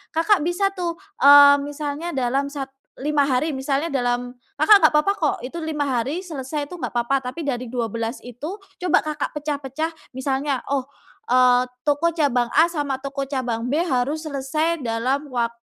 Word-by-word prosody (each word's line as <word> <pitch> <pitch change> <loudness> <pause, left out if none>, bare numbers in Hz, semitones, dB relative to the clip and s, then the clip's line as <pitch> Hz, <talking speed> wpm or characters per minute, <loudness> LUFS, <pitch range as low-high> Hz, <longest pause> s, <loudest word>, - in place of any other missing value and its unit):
Kakak 360 +5 +3
bisa 350 +5 0
tuh, 350 -3 -3 0.2
eee, 285 0 +9
misalnya 295 +3 -4
dalam 265 +2 0
sat 280 -2 -6 0.3
5 295 +1 +1
hari 275 +2 0
misalnya 275 +3 -1
dalam 245 -3 -1 0.2
Kakak 395 +5 +7
gak 315 - +7
papa 300 +6 +3
kok 310 -6 0
itu 255 +6 -8
5 300 -2 -2
hari 260 +5 -1
selesai 295 -4 -5
itu 355 - -9
gak 345 - -4
papa, 245 +3 0
tapi 275 +5 -5
dari 250 -3 -3
12 230 -1 -3
itu 295 - -7
coba 365 -3 0
Kakak 305 -1 -3
pecah-pecah 295 +1 -3 0.2
misalnya, 270 +1 -1
oh, 275 -2 +1 0.5
eee, 250 0 +5 0.2
toko 300 +3 +2
cabang 260 -7 +2
A 325 - +6
sama 290 -4 -2
toko 275 0 -3
cabang 245 -4 -2
B 300 - +2
harus 280 +3 0
selesai 305 +4 -1
dalam 250 +5 -1
waktu 235 -1 -1
280 Hz, 165 wpm, -22 LUFS, 255-310 Hz, 0.5 s, eee